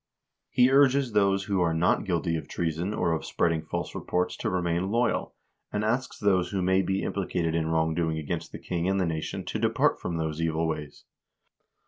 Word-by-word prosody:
He 125 Hz, +1 st, +4 dB
urges 135 Hz, -2 st, +4 dB
those 100 Hz, -2 st, +3 dB
who 100 Hz, -2 st, 0 dB
are 85 Hz, -2 st, +2 dB
not 85 Hz, +2 st, +2 dB
guilty 85 Hz, -2 st, 0 dB
of 80 Hz, -, -4 dB
treason 85 Hz, +3 st, -2 dB
or 90 Hz, -5 st, 0 dB
of 80 Hz, -, -1 dB
spreading 80 Hz, -2 st, 0 dB
false 80 Hz, -, -4 dB
reports 90 Hz, 0 st, -1 dB
to -, -, -2 dB
remain 90 Hz, 0 st, 0 dB
loyal, 115 Hz, +2 st, 0 dB, 0.4 s
and 105 Hz, +1 st, -1 dB
asks 120 Hz, +4 st, -1 dB
those 95 Hz, -4 st, +2 dB
who 95 Hz, -2 st, -1 dB
may 95 Hz, +1 st, +3 dB
be 95 Hz, 0 st, -1 dB
implicated 90 Hz, -4 st, -1 dB
in 80 Hz, -1 st, 0 dB
wrong 80 Hz, 0 st, +1 dB
doing 80 Hz, -1 st, 0 dB
against 75 Hz, -2 st, -4 dB
the -, -, -6 dB
king 90 Hz, +1 st, -2 dB
and 95 Hz, 0 st, +1 dB
the 95 Hz, -, +2 dB
nation 80 Hz, -2 st, -3 dB
to -, -, -3 dB
depart -, -, +2 dB
from 85 Hz, -1 st, -3 dB
those 80 Hz, 0 st, -2 dB
evil 80 Hz, 0 st, 0 dB
ways. 75 Hz, -2 st, -5 dB
90 Hz, 195 wpm, -27 LUFS, 80-100 Hz, 0.4 s, He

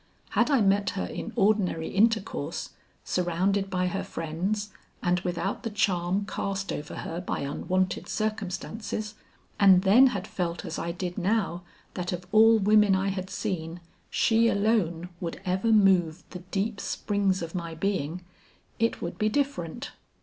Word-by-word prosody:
Had -, -, +2 dB
I 275 Hz, -5 st, +4 dB
met 200 Hz, 0 st, +3 dB
her -, -, -1 dB
in 230 Hz, -, -6 dB
ordinary 195 Hz, -7 st, +2 dB
intercourse, 210 Hz, -, 0 dB, 0.3 s
surrounded 185 Hz, +3 st, 0 dB
by 180 Hz, -1 st, 0 dB
her 180 Hz, +2 st, -2 dB
friends 190 Hz, +7 st, -3 dB, 0.3 s
and 180 Hz, 0 st, +2 dB
without 180 Hz, +2 st, -2 dB
the 230 Hz, -, -3 dB
charm 195 Hz, -2 st, 0 dB
cast 195 Hz, -1 st, -3 dB
over 150 Hz, -, -6 dB
her 170 Hz, +2 st, -4 dB
by 180 Hz, -, -3 dB
unwonted 185 Hz, +6 st, -1 dB
circumstances, 215 Hz, 0 st, -3 dB, 0.5 s
and 190 Hz, -2 st, +7 dB
then 225 Hz, +7 st, +7 dB
had 200 Hz, -7 st, -2 dB
felt 170 Hz, -2 st, -3 dB
as 160 Hz, -, -4 dB
I 170 Hz, -, -2 dB
did 180 Hz, +1 st, -4 dB
now 195 Hz, -2 st, 0 dB, 0.3 s
that 175 Hz, -1 st, -3 dB
of 180 Hz, 0 st, -4 dB
all 225 Hz, +1 st, +7 dB
women 210 Hz, -1 st, +5 dB
I 190 Hz, +1 st, 0 dB
had 190 Hz, -1 st, -4 dB
seen, 175 Hz, -6 st, -3 dB, 0.3 s
she 230 Hz, 0 st, +3 dB
alone 200 Hz, -6 st, +1 dB
would 170 Hz, -2 st, -4 dB
ever 190 Hz, +5 st, +1 dB
move 185 Hz, -6 st, +4 dB
the 180 Hz, -, -6 dB
deep 195 Hz, +4 st, -3 dB
springs 200 Hz, -3 st, 0 dB
of 165 Hz, -, -6 dB
my 170 Hz, -3 st, -4 dB
being, 180 Hz, -2 st, -2 dB, 0.6 s
it 230 Hz, 0 st, 0 dB
would 170 Hz, -, -5 dB
be 215 Hz, -, +2 dB
different. 265 Hz, -, -2 dB
195 Hz, 150 wpm, -27 LUFS, 175-210 Hz, 0.6 s, and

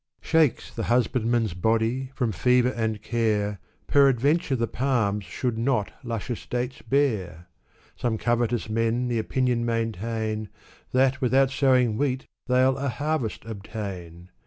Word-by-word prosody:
Shakes 160 Hz, -6 st, +2 dB
the 115 Hz, -, -3 dB
husbandman's 120 Hz, -3 st, +1 dB
body, 115 Hz, +7 st, 0 dB
from 125 Hz, -5 st, 0 dB
fever 125 Hz, +6 st, +3 dB
and 110 Hz, -4 st, -2 dB
care, 105 Hz, -3 st, 0 dB, 0.3 s
Peradventure 140 Hz, +2 st, +3 dB
the 115 Hz, -2 st, 0 dB
palms 115 Hz, -6 st, 0 dB
should 120 Hz, -3 st, -3 dB
not 120 Hz, -4 st, 0 dB
luscious 120 Hz, 0 st, -4 dB
dates 125 Hz, +2 st, -3 dB
bear. 95 Hz, -, -1 dB, 0.5 s
Some 115 Hz, -2 st, -1 dB
covetous 120 Hz, 0 st, 0 dB
men 115 Hz, +3 st, 0 dB
the 120 Hz, -2 st, 0 dB
opinion 125 Hz, +1 st, 0 dB
maintain, 110 Hz, -1 st, -2 dB, 0.4 s
That, 130 Hz, +1 st, +2 dB
without 135 Hz, +1 st, +3 dB
sowing 130 Hz, -5 st, +3 dB
wheat, 135 Hz, -2 st, 0 dB, 0.2 s
they'll 130 Hz, +1 st, +3 dB
a 140 Hz, 0 st, -1 dB
harvest 145 Hz, -3 st, -2 dB
obtain 95 Hz, -5 st, -7 dB
120 Hz, 125 wpm, -25 LUFS, 110-130 Hz, 0.5 s, fever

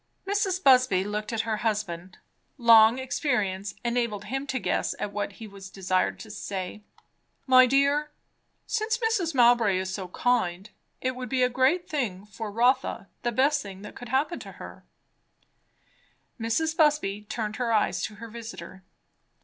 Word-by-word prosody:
Mrs. 390 Hz, -2 st, 0 dB
Busby 255 Hz, -8 st, +5 dB
looked 210 Hz, +2 st, -4 dB
at 225 Hz, -1 st, 0 dB
her 220 Hz, -1 st, -2 dB
husband. 195 Hz, -5 st, -3 dB, 0.4 s
Long 230 Hz, -1 st, +7 dB
experience 245 Hz, -7 st, -1 dB
enabled 235 Hz, -4 st, -1 dB
him 270 Hz, +6 st, -4 dB
to 265 Hz, -, -1 dB
guess -, -, -1 dB
at 205 Hz, -, -4 dB
what 205 Hz, 0 st, -3 dB
he 225 Hz, -, -10 dB
was 195 Hz, -1 st, -11 dB
desired 185 Hz, -1 st, -1 dB
to 220 Hz, -, -10 dB
say. 195 Hz, 0 st, -5 dB, 0.6 s
"My 255 Hz, -1 st, +7 dB
dear 280 Hz, +3 st, +2 dB, 0.6 s
since 450 Hz, +1 st, 0 dB
Mrs. 435 Hz, -, 0 dB
Mowbray 235 Hz, -5 st, +5 dB
is 185 Hz, 0 st, -3 dB
so 190 Hz, -2 st, -4 dB
kind 195 Hz, -2 st, 0 dB, 0.3 s
it 255 Hz, 0 st, -1 dB
would 250 Hz, -1 st, -6 dB
be 255 Hz, 0 st, +2 dB
a 250 Hz, -, +3 dB
great 265 Hz, +9 st, +2 dB
thing 210 Hz, -10 st, -3 dB
for 210 Hz, +1 st, -7 dB
Rotha 245 Hz, -2 st, +1 dB
the 240 Hz, -, -1 dB
best 280 Hz, +5 st, +2 dB
thing 195 Hz, -1 st, -9 dB
that -, -, -10 dB
could 245 Hz, -, -9 dB
happen 290 Hz, +7 st, 0 dB
to -, -, -10 dB
her -, -, -11 dB, 0.8 s
" -, -, -39 dB
Mrs. 315 Hz, +8 st, 0 dB
Busby 300 Hz, -, +2 dB
turned 220 Hz, -1 st, -3 dB
her 245 Hz, -2 st, -1 dB
eyes 205 Hz, -4 st, +1 dB
to 215 Hz, -, -8 dB
her 230 Hz, +2 st, -9 dB
visiter. 225 Hz, -4 st, -9 dB
230 Hz, 160 wpm, -27 LUFS, 205-265 Hz, 0.8 s, Long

